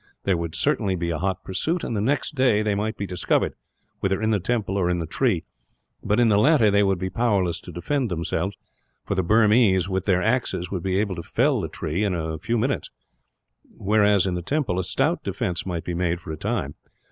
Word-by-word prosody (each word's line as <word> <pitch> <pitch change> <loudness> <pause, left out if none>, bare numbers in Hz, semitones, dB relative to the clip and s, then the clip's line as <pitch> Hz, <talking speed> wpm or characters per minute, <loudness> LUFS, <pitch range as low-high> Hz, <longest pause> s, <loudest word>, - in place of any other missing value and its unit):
There 95 - +2
would 85 -1 -4
certainly 105 - +1
be 85 -1 -2
a 80 - -2
hot 95 +1 -2
pursuit, 160 - -1
and 115 - -3
the 100 - 0
next 140 +7 0
day 130 -6 +3
they 105 -1 +1
might 105 +2 -2
be 100 - -3
discovered, 90 -2 0 0.5
whether 95 0 0
in 110 +1 +1
the 105 - +2
temple 100 0 -1
or 90 -3 +1
in 90 - +1
the 85 - -3
tree; - - 0 0.6
but 105 +2 +1
in 120 - +5
the 105 -2 +4
latter 125 -4 +5
they 100 0 +4
would 95 -2 +2
be 95 +1 -4
powerless 100 -8 0
to 90 - -10
defend 125 - -1
themselves, 90 +2 -2 0.5
for - - -1
the 95 - +1
Burmese, 105 -1 +4
with 95 -1 -2
their 90 -2 +2
axes, 110 -7 0
would 95 -3 -2
be 95 +1 0
able 100 -1 0
to - - -3
fell - - +1
it - - -6
in 90 +5 0
a 80 -1 -3
few 115 +1 -1
minutes; 130 +5 -1 0.9
whereas 105 -1 +3
in 95 - -1
the 90 - -2
temple 125 - -1
a - - 0
stout 140 - 0
defence 95 -2 -3
might 85 -3 -3
be 90 - -4
made 85 0 0
for 80 - -8
a - - -3
time. 105 -6 -2
95 Hz, 220 wpm, -24 LUFS, 90-110 Hz, 0.9 s, in